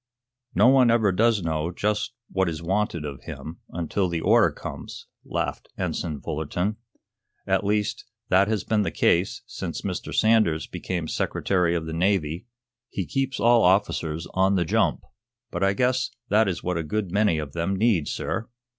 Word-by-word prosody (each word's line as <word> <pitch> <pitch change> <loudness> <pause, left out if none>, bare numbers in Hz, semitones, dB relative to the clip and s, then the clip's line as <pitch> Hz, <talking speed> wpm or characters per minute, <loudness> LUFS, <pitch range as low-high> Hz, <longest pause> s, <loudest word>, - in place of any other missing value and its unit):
"No 105 +7 +6
one 130 -2 +6
ever 115 -4 +4
does 110 +1 +2
know 80 0 -1
just 105 +6 -1 0.2
what 95 -2 +1
is 80 0 -5
wanted 95 -3 -1
of 70 -2 -6
him, 80 +2 -8
until 90 +3 -1
the 85 -1 -1
order - - +5
comes," - - -8 0.2
laughed - - -3
Ensign 75 -4 -3
Fullerton. 90 +7 -2 0.7
"At - - +1
least, 105 +1 -1 0.2
that 95 +2 +4
has 110 -1 0
been 110 -1 +1
the 100 - 0
case 90 +3 +1
since - - -5
Mr. - - -4
Sanders 110 -9 +3
became 85 -4 -4
Secretary 90 +1 0
of 80 -1 -2
the 80 - -5
Navy. 90 +1 0 0.4
He 95 - -3
keeps 135 +4 -2
all 120 0 +5
officers 90 -4 +1
on 95 +1 +3
the 90 -2 +1
jump. - - +1 0.5
But - - -2
I 95 0 +3
guess 125 +3 +1 0.2
that 110 +1 +4
is 90 -4 -2
what 90 -1 -1
a 80 - -1
good 100 +3 -2
many 100 -3 +2
of 75 -3 -5
them 85 +4 -1
need, 100 -7 +2
sir." 110 - -3
95 Hz, 170 wpm, -25 LUFS, 85-105 Hz, 0.7 s, No